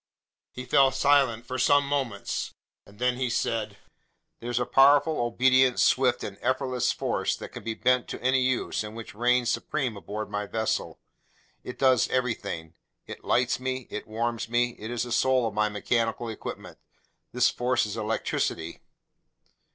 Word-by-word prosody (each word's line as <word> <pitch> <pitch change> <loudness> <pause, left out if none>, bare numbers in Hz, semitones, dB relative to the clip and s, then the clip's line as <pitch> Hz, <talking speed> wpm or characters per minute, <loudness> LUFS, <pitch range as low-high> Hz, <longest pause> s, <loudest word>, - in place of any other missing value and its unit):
He 125 - -8
fell 135 +1 +4
silent 135 -4 +2
for 130 +1 -4
some 145 +2 +4
moments, 135 -8 -3 0.3
then 125 +5 -1
he 130 -1 -1
said: 110 -3 -2 0.6
"There's 120 +1 -2
a 125 - 0
powerful, 145 +4 +4
obedient, 130 +2 +3
swift, 130 -1 +3
and 100 - -7
effortless 130 0 0
force - - -1
that - - -9
can - - -10
be 110 -1 -3
bent 125 +1 +2
to - - -6
any 130 +1 +2
use 130 -3 0
and 105 +1 -8
which 115 -1 -8
reigns 120 +2 +2
supreme 130 -7 -2
aboard 105 +2 -6
my 105 0 -3
vessel. 110 +1 -2 0.6
It 125 - -8
does 130 -4 +3
everything. 100 -10 -2 0.3
It - - -10
lights 125 0 +1
me, 130 -1 -3
it - - -6
warms 115 +1 -3
me, 120 +1 +1
it's 115 +1 -3
the 120 - -7
soul 130 0 +2
of 110 - -5
my 105 0 +1
mechanical 115 +2 -1
equipment. 110 - -8 0.5
This 125 +1 +3
force 125 -1 0
is 105 - -5
electricity." 105 -6 -2
120 Hz, 155 wpm, -27 LUFS, 110-130 Hz, 0.6 s, fell